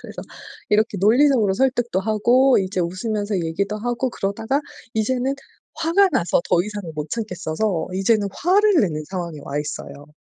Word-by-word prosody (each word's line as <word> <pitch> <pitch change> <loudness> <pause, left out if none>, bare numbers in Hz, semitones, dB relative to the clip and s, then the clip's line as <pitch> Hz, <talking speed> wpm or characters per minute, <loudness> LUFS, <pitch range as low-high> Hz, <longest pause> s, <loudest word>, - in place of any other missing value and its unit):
그래서 - - -9 0.5
이렇게 210 -1 +1
논리적으로 225 0 +4
설득도 240 -4 +1
하고 235 +6 +3
이제 190 -1 -1
웃으면서 205 +4 -2
얘기도 195 +6 -2
하고 245 +3 -2
그러다가 220 +7 -2 0.3
이제는 255 +4 0 0.4
화가 335 +5 +3
나서 180 - +1
더 170 - +4
이상은 205 -4 -6
못 150 0 -5
참겠어서 185 -4 -2
이제는 200 +2 +2
화를 405 - +3
내는 155 -7 -1
상황에 175 -5 -5
와 145 - -3
있어요. 145 -1 -6
210 Hz, 360 characters per minute, -21 LUFS, 180-245 Hz, 0.5 s, 논리적으로